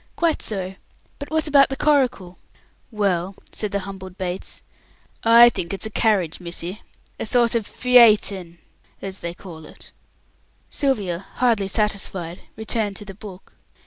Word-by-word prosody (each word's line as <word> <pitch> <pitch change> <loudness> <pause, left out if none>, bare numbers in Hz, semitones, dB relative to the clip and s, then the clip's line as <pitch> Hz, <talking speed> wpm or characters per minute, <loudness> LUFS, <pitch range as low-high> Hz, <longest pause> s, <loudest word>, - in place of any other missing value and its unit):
Quite 335 -2 +1
so. 190 -3 -4 0.5
But 285 - -7
what 315 0 0
about 275 -2 +4
coracle?" 250 -12 +1 0.5
"Well," 195 -4 -1 0.2
said 210 -2 -3
the 200 - -1
humbled 190 -1 -9
Bates, 185 -1 -5 0.6
"I 235 +1 +8
think 175 -6 -4
it's 195 - -4
a 220 - -5
carriage, 200 -8 +1
missy. 175 +2 -6 0.4
A - - -3
sort 235 +1 +3
of 230 -3 0
Pheayton, 210 -8 +4 0.5
as 195 -1 -6
they 170 0 -5
call 170 -4 -11
it." - - -15 0.8
Sylvia, 200 - -1
hardly 230 -6 +2
satisfied, 190 -4 -1
returned 220 -2 -2
to 205 - -5
the 195 - -8
book. 195 -1 -12
200 Hz, 140 wpm, -22 LUFS, 185-235 Hz, 0.8 s, I